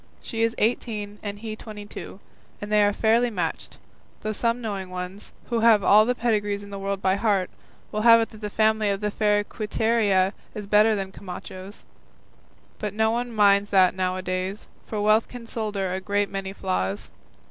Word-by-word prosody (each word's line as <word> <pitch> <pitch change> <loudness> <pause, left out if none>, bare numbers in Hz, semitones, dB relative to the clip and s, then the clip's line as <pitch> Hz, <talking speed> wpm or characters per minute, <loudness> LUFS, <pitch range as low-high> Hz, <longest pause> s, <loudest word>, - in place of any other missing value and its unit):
She 225 - -5
is 230 +1 +1
eighteen, 210 -2 -1
and 205 -1 -5
he 215 0 -6
twenty 215 -1 -9
two, 200 - -9 0.4
and 205 +1 -7
they 210 -1 +5
are 205 - +4
fairly 230 +3 +2
matched, 180 -7 -4 0.4
though 215 - -2
some 230 +2 0
knowing 200 -5 -4
ones, 185 +2 -7 0.2
who 235 - +2
have 225 -3 +5
all 215 +3 +6
the 250 - +1
pedigrees 205 -4 0
in 200 - -11
the 200 - -6
world 195 0 -3
by 190 +1 +2
heart, 200 -4 +1 0.4
will 215 - -2
have 230 0 +8
it 225 - -1
that 215 - -13
the 210 - -3
family 215 0 +2
of 200 -1 -1
the 210 0 -2
fair 210 0 +2
Quiteria 210 -3 +1 0.2
is 210 -2 -5
better 210 +2 +4
than 195 -1 -4
Camacho's; 190 +1 -9 1.0
but 210 -1 -4
no 220 0 +2
one 240 +1 -2
minds 205 -2 +4
that 185 -2 +5
now 185 0 -1
a 185 - -5
days, 185 +2 -3 0.2
for 215 - -3
wealth 215 +2 +3
can 245 -2 -10
solder 210 -5 -3
a 190 - -2
great 205 +1 0
many 195 -1 -4
flaws. 95 - -3
205 Hz, 190 wpm, -25 LUFS, 195-220 Hz, 1.0 s, have